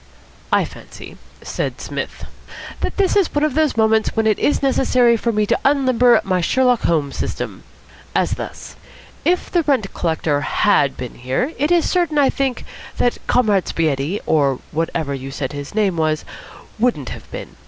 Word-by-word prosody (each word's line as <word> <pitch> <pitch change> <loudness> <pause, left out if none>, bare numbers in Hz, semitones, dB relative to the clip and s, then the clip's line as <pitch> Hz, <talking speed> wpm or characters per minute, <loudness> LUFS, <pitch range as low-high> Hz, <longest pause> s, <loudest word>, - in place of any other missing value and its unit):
"I - - +3
fancy," - - -12 0.3
said - - -3
Psmith, - - -5 0.5
"that - - -3
this 395 -1 +2
is 395 -4 +3
one 290 - +2
of 305 -3 +1
those 305 -4 +1
moments 220 0 +2
when 225 -1 +1
it 215 -2 +2
is 290 - +1
necessary 255 -3 +3
for 230 +1 -1
me 215 -1 +1
to - - +1
unlimber 255 -4 +4
my 185 -2 0
Sherlock 250 +5 +2
Holmes 150 -4 0
system. - - -4 0.5
As - - +2
thus. - - -6 0.5
If 360 +1 0
the 350 - +3
rent 265 -10 0
collector 160 -3 0
had 145 -3 +2
been 125 -2 -6
here, 130 - -2
it 295 +3 +1
is 345 -2 +3
certain, 345 -4 +1
I 280 -2 +4
think, 270 -2 -2 0.3
that 245 - +1
Comrade 210 -6 +2
Spaghetti, 155 +4 -1
or 140 -4 +2
whatever 160 -2 -2
you 135 0 -6
said 135 0 -4
his 145 +5 -7
name 200 -5 +1
was, 155 -1 0 0.5
wouldn't 215 - 0
have - - -9
been. - - -8
220 Hz, 170 wpm, -19 LUFS, -, 0.5 s, unlimber